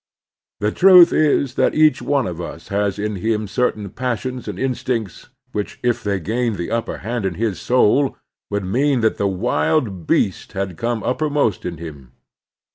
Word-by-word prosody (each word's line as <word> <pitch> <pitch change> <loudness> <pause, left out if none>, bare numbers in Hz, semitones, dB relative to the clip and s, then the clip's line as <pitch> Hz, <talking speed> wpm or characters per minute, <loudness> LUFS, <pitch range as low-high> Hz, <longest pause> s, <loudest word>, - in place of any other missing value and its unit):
The 105 +1 +1
truth 180 - +7
is 140 -4 +2
that - - +2
each 155 -4 +4
one 140 -4 +1
of 90 -1 -5
us 85 -1 -8
has 100 0 0
in 105 0 -3
him 110 +2 -1
certain 105 -2 -1
passions 125 0 -3
and - - -5
instincts 125 -6 -3 0.2
which 105 -3 -4
if 120 -1 0
they 100 -2 -1
gained 115 +5 -1
the 85 - -5
upper 115 0 -2
hand 120 0 -2
in 95 -3 -2
his 110 -1 -2
soul 130 +2 +2 0.3
would 100 -1 -2
mean 130 +6 +1
that 110 - +1
the 100 - +1
wild 100 - 0
beast - - 0
had 95 -2 -3
come 115 +3 -2
uppermost 145 - 0
in 85 -2 -5
him. 75 -6 -10
110 Hz, 170 wpm, -20 LUFS, 95-125 Hz, 0.3 s, truth